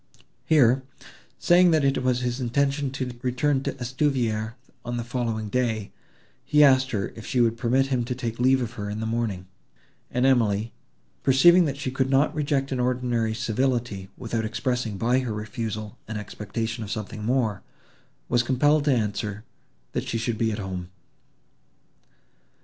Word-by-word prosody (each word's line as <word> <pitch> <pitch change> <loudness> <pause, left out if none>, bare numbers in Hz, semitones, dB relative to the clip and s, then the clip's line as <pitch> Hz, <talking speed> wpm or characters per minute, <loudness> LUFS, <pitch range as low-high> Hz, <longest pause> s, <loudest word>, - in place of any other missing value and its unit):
Here, 135 -5 +4 0.6
saying, 175 +1 +5
that 155 -3 +3
it 135 -1 +2
was 125 -1 +1
his 125 +1 -2
intention 140 +3 0
to 130 -1 -4
return 130 +2 +1
to - - -2
Estuvière 125 -4 -1 0.3
on 120 0 -3
the 120 - -2
following 115 -3 -2
day, 110 -3 -1 0.5
he 150 0 +4
asked 130 -2 +5
her 100 -4 -2
if 110 - -9
she 125 - -1
would 115 -1 +3
permit 125 +3 +2
him 125 -2 +1
to 125 +1 -3
take 120 -2 -4
leave 130 +1 +4
of 120 - -4
her 105 -2 -5
in 105 +1 -4
the 110 - -3
morning; 110 -5 -2 0.6
and 125 +1 +1
Emily, 115 -4 +2 0.5
perceiving 170 +7 +6
that 140 -2 -2
she 135 -2 -3
could 130 0 0
not 135 +2 +3
reject 140 -2 -1
an 130 - -1
ordinary 120 -3 0
civility, 120 -4 -1
without 115 -1 -2
expressing 115 -1 -2
by 120 +5 +2
her 125 -4 -3
refusal 110 0 -5
an 110 0 -4
expectation 110 +2 -4
of 105 - -7
something 105 0 -5
more, 110 -4 0 0.7
was 120 0 +3
compelled 145 +4 +2
to 145 - +3
answer, 105 -1 -2 0.5
that - - -3
she 115 - -1
should 115 -1 -2
be 115 -1 +1
at 105 - -3
home. 95 -3 -5
120 Hz, 165 wpm, -25 LUFS, 110-130 Hz, 0.7 s, perceiving